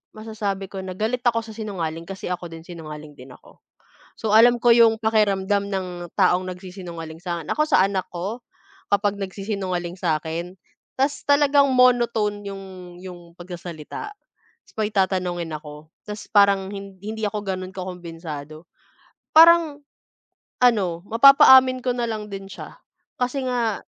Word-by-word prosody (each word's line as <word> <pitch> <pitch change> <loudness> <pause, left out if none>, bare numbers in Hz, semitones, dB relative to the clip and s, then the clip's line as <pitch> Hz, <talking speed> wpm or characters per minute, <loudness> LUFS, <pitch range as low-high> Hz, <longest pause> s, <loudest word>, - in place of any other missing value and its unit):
masasabi 210 -3 -4
ko 195 - -6
na 185 -1 -6
galit 225 +5 -1
ako 230 -1 +1
sa 220 - -10
sinungaling 170 -7 -5
kasi 195 +2 -7
ako 175 -1 -4
din 165 0 -11
sinungaling 155 -3 -9
din 130 +1 -12
ako. - - -20 0.6
So 215 -1 -2
alam 240 +2 +6
ko 235 0 +5
'yung 230 -1 +5
pakiramdam 205 -2 +1
ng 190 -2 -2 0.3
taong 185 -1 +3
nagsisinungaling 175 -3 -9
sa'kin. 170 -3 -3
Ako 305 - +2
sa 190 - +5
anak 195 -2 -3
ko, 195 +8 -5 0.5
kapag 205 0 0
nagsisinungaling 190 -3 -4
sa'kin 165 +2 -3 0.4
tas 280 +2 0
talagang 285 -1 +4
monotone 235 -5 +3
'yung 195 0 -8 0.4
'yung 180 -2 -9 0.2
pagsasalita. 175 - -8 0.5
Tas - - -24
may 210 - +1
tatanungin 180 -4 -1
ako 150 +1 -11
tas 210 0 -8
parang 200 -2 +4
hin 195 -1 -9
hindi 220 +2 -6
ako 210 0 -3
gano'n 185 0 -4
kakumbensado 165 -4 -8 0.7
parang 325 -3 +6 0.8
ano 190 -8 +2
mapapaamin 260 +1 +7
ko 250 - +1
na 240 - -3
lang 215 -2 -4
din 195 0 -7
siya - - -10 0.4
kasi 255 +1 -2
nga, 235 -4 0
195 Hz, 140 wpm, -23 LUFS, 175-225 Hz, 0.8 s, mapapaamin